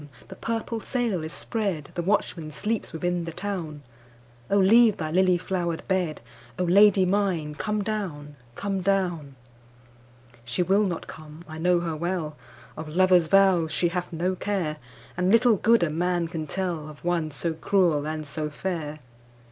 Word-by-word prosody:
the 190 - -8
purple 230 +2 -3
sail 225 - -1
is 160 - -5
spread, 195 -11 -3
The 175 - -2
watchman 170 -4 -1
sleeps 210 +9 -3
within 175 +1 -2
the 165 - -5
town,O 125 -8 -6
leave 215 +3 +6
thy 155 -1 -3
lily 185 +1 +4
flowered 175 -2 -3
bed,O 150 -7 -3
Lady 195 +2 +5
mine 180 -6 0
come 210 +7 -2
down, 170 -9 -4 0.2
come 195 +3 -2
down! 175 -7 -1 1.1
She 120 +9 -1
will 195 +4 +3
not 175 -3 -4
come, 155 +2 -11
I 155 0 -8
know 175 +1 +3
her 165 -2 -3
well, 170 -2 -3 0.4
Of 155 0 -7
lover's 180 -2 +5
vows 185 -3 +4
she 175 +3 +1
hath 180 0 -3
no 175 +3 -1
care, 180 -6 -2 0.4
And 180 +1 +1
little 230 -1 +5
good 230 -1 +4
a 160 - 0
man 175 +1 0
can 160 -2 -5
tellOf 160 -5 -4
one 170 -3 0
so 160 +3 -2
cruel 160 -3 +1
and 155 0 -4
so 150 +1 -4
fair. 155 -2 -4
175 Hz, 155 wpm, -26 LUFS, 155-195 Hz, 1.1 s, leave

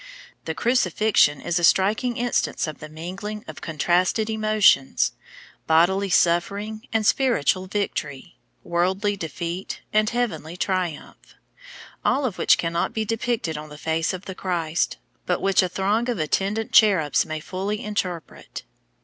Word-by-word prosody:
The 160 - -3
Crucifixion 215 - +2
is 175 0 0
a - - -4
striking 205 +8 +3
instance 245 0 0
of 155 -2 -7
the 155 - -9
mingling, 190 +7 -7
of 155 - -9
contrasted 180 +7 +1
emotions, 215 -10 +3 0.6
bodily 190 +5 +3
suffering 200 +6 +1
and 220 -1 0
spiritual 190 - +2
victory, 175 -6 -4 0.2
worldly 190 +4 0
defeat 175 +1 -5
and 215 0 +3
heavenly 180 -9 -3
triumph, 180 -5 -3 0.7
all 275 +1 +2
of 220 -7 -3
which - - +5
cannot 170 0 -1
be 220 -1 -1
depicted 225 -7 -2
on 155 0 -9
the 150 - -11
face 160 +1 -1
of 185 0 -7
the 190 - -6
Christ, 170 -4 -1 0.3
but 180 - +1
which 195 -1 +3
a 185 - -1
throng 210 +7 0
of 240 - -1
attendant 200 +8 -1
cherubs 190 - +4
may 155 0 -5
fully 195 +6 -4
interpret. 185 -6 -5
185 Hz, 140 wpm, -23 LUFS, 165-215 Hz, 0.7 s, which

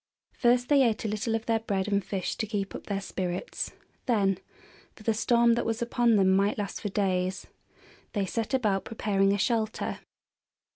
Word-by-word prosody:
First 245 0 +3
they 285 -2 +6
ate 230 -3 +1
a - - +1
little 215 +2 -1
of 225 0 -3
their 225 -1 +2
bread 200 -3 -2
and 200 -1 +1
fish 190 -2 -3
to 220 - -2
keep 200 -2 -3
up - - -8
their 200 -1 -2
spirits; 185 -2 -3 0.3
then 195 -6 +2 0.6
for 215 - -15
the 225 - +2
storm 235 +1 +4
that 235 - 0
was 225 0 -1
upon 235 -1 +2
them 190 -2 +4
might 200 +2 +2
last 205 -2 -4
for 210 - -2
days 185 -2 0 0.7
they 200 -3 0
set 230 +6 -1
about 210 -7 +1
preparing 195 -3 +1
a 200 - +2
shelter. 220 +1 -1
210 Hz, 185 wpm, -28 LUFS, 195-230 Hz, 0.7 s, they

